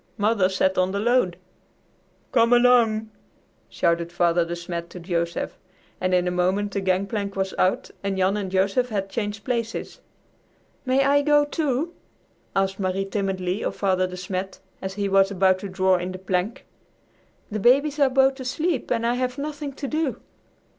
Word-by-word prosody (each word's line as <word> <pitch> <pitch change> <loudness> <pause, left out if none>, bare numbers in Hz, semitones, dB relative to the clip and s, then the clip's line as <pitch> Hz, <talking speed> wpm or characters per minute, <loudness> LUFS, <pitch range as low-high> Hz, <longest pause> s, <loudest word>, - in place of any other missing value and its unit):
Mother 205 -3 +2
sat 190 0 +1
on 185 +1 +1
the 200 - -1
load." 225 -6 +2 0.9
"Come 230 -1 +4
along!" 235 -3 +4 0.6
shouted 170 0 0
Father 175 0 +2
De 170 +1 -4
Smet 170 0 -5
to 180 - -9
Joseph, 170 -1 -3 0.4
and 185 0 +1
in 180 0 +2
a - - +1
moment 185 +3 0
the 200 - -2
gangplank 195 +2 -1
was 190 -1 -1
out 185 - +1
and 195 -1 -1
Jan 190 +1 +2
and 200 -2 -3
Joseph 195 +6 +1
had 195 -3 -3
changed 205 -2 -3
places. 230 -1 -3 0.9
"May 265 +2 +3
I 285 +1 +4
go, 295 0 +4
too?" 300 +1 -1 0.6
asked 195 0 0
Marie 190 0 -1
timidly 195 -1 -2
of - - -2
Father 185 -2 +1
De 180 0 -8
Smet 185 +1 -4 0.2
as 190 0 -5
he 200 -1 -1
was 195 0 +4
about 190 -1 +2
to 200 - -6
draw 190 0 +2
in 180 +1 -4
the - - -6
plank. 185 +3 -2 0.9
"The 215 - -2
babies 280 +7 +3
are 280 -2 +5
both 265 +1 +3
asleep 270 +3 -2
and 230 -1 0
I 235 - +2
have 250 +1 -2
nothing 295 0 -4
to 280 +1 -5
do." 305 -1 -1
195 Hz, 170 wpm, -24 LUFS, 185-245 Hz, 0.9 s, are